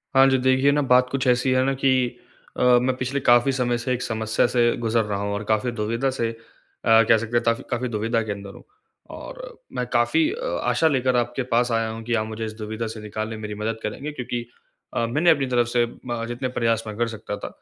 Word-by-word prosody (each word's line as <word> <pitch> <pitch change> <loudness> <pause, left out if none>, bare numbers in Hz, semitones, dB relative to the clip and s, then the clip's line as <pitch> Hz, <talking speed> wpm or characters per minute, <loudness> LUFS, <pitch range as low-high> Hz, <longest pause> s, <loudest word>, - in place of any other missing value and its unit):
हाँ 135 0 +7
जी। 130 - +3
देखिए 130 +2 +3
ना 145 0 +2
बात 125 -1 +4
कुछ 135 0 -2
ऐसी 125 +1 +3
है 130 0 +3
ना 135 - +1
कि 135 - +5 0.7
अ, - - +1
मैं 125 +1 +4
पिछले 130 +2 -2
काफ़ी 120 +1 +4
समय 125 -2 0
से 125 +2 -2
एक 125 - -3
समस्या 110 -1 0
से 125 - +3 0.2
गुज़र 115 -1 +1
रहा 105 -1 -3
हूँ 100 0 -2
और 100 +1 -3
काफ़ी 110 +3 +1
दुविधा 115 +4 -1
से 115 -3 -1
अ, - - -11 0.5
कह 115 0 +6
सकते 115 +2 -1
हैं - - +1
काफ़ी 115 +2 0
काफ़ी 120 +1 -1
दुविधा 115 +1 0
के 110 - -4
अंदर 100 -1 -7
हूँ। - - -13 0.5
और - - -9 0.2
मैं 125 - -2
काफ़ी 120 +7 +3
अ, 480 +4 -5 0.2
आशा 160 - +2
लेकर 130 -4 +1
आपके 120 +2 0
पास 120 +1 +2
आया 115 -1 0
हूँ 115 0 -6
कि, 120 +1 -2
आप 110 -2 +1
मुझे 110 0 -5
इस 110 - -6
दुविधा 110 +1 -4
से 110 - -8
निकालने 110 +1 -4
में 110 - -9
मेरी 105 -1 -5
मदद 110 +1 -2
करेंगे, 135 +8 -4
क्योंकि 120 -4 -4 0.5
अ, 115 - 0
मैंने 150 +9 +2
अपनी 145 -4 +4
तरफ 120 -2 +2
से 120 0 +2
ब 120 0 -6
जितने 120 +2 -3
प्रयास 115 -1 +1
मैं 105 - -5
कर 120 0 +1
सकता 110 -2 -6
था - - -6
120 Hz, 240 wpm, -23 LUFS, 110-130 Hz, 0.7 s, हाँ